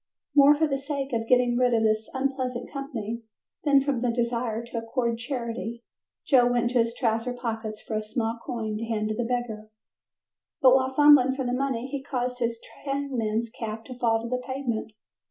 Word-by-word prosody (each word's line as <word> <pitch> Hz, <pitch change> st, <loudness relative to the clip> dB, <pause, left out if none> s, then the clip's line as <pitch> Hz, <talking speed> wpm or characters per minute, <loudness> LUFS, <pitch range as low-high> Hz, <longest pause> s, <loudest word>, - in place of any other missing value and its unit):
More 290 Hz, +1 st, +7 dB
for 320 Hz, -, +3 dB
the 275 Hz, -2 st, -1 dB
sake 275 Hz, -1 st, -4 dB
of 225 Hz, -1 st, -1 dB
getting 250 Hz, -1 st, +4 dB
rid 250 Hz, -1 st, +3 dB
of 225 Hz, -, +2 dB
his 215 Hz, 0 st, +1 dB
unpleasant 260 Hz, -2 st, -2 dB
company, 235 Hz, -5 st, -4 dB, 0.4 s
than 285 Hz, -2 st, +5 dB
from 270 Hz, -4 st, -1 dB
a 245 Hz, -, +2 dB
desire 235 Hz, -1 st, -1 dB
to 235 Hz, 0 st, -4 dB
accord 230 Hz, 0 st, -1 dB
charity, 235 Hz, -2 st, -4 dB, 0.4 s
Joe 250 Hz, -4 st, +5 dB
went 240 Hz, 0 st, +1 dB
into 250 Hz, -, +2 dB
his 230 Hz, 0 st, +1 dB
trouser 230 Hz, 0 st, 0 dB
pockets 225 Hz, -3 st, -4 dB
for -, -, -6 dB
a -, -, -1 dB
small 225 Hz, +1 st, -2 dB
coin 220 Hz, -3 st, -3 dB
to 230 Hz, -, -3 dB
hand 215 Hz, -2 st, -1 dB
to 215 Hz, -, -1 dB
the 240 Hz, -, -1 dB
beggar, 230 Hz, -3 st, -3 dB, 0.9 s
but 260 Hz, -4 st, +7 dB
while 260 Hz, 0 st, +3 dB
fumbling 290 Hz, -3 st, +7 dB
for 265 Hz, -1 st, -3 dB
the 245 Hz, -, -1 dB
money 255 Hz, -2 st, -1 dB
he 270 Hz, +1 st, -4 dB
caused 250 Hz, -2 st, -3 dB
his 230 Hz, -1 st, -1 dB, 0.2 s
trainman's 235 Hz, -6 st, -1 dB
cap 225 Hz, -1 st, -6 dB
to 255 Hz, -2 st, -9 dB
fall 225 Hz, -2 st, +2 dB
to -, -, -4 dB
the 250 Hz, +1 st, -2 dB
pavement. 250 Hz, -5 st, -3 dB
245 Hz, 190 wpm, -26 LUFS, 225-265 Hz, 0.9 s, More